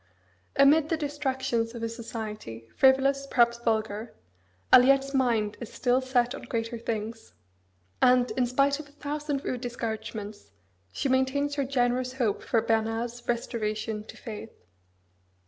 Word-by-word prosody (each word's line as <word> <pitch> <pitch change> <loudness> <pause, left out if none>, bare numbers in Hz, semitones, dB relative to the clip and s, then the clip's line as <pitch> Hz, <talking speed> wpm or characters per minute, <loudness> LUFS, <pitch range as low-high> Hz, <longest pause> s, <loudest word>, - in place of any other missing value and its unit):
Amid 295 +3 +5
the 325 - +1
distractions 265 -6 -2
of 230 - -6
a - - +1
society, 215 - -7
frivolous, 275 +1 +4
perhaps 235 -2 +3
vulgar, 220 -1 -2 0.6
Aliette's 275 +2 +6
mind 230 -6 +1
is 235 - -7
still 250 +1 +1
set 250 -1 +1
on - - -7
greater 230 -1 -3
things; 225 0 -5 0.7
and, 250 0 +4
in 250 -2 +1
spite 275 +3 +2
of 295 -1 -9
a - - -22
thousand 290 -1 -3
rude 250 -2 -2
discouragements, 220 - -5 0.4
she - - -2
maintains 265 +2 +1
her 280 -1 0
generous 250 -1 0
hope 240 -6 0
for 225 -2 +1
Bernard's 225 +1 -1
restoration 220 -2 -2
to - - -12
faith. 225 -2 -7
245 Hz, 135 wpm, -27 LUFS, 225-270 Hz, 0.7 s, Aliette's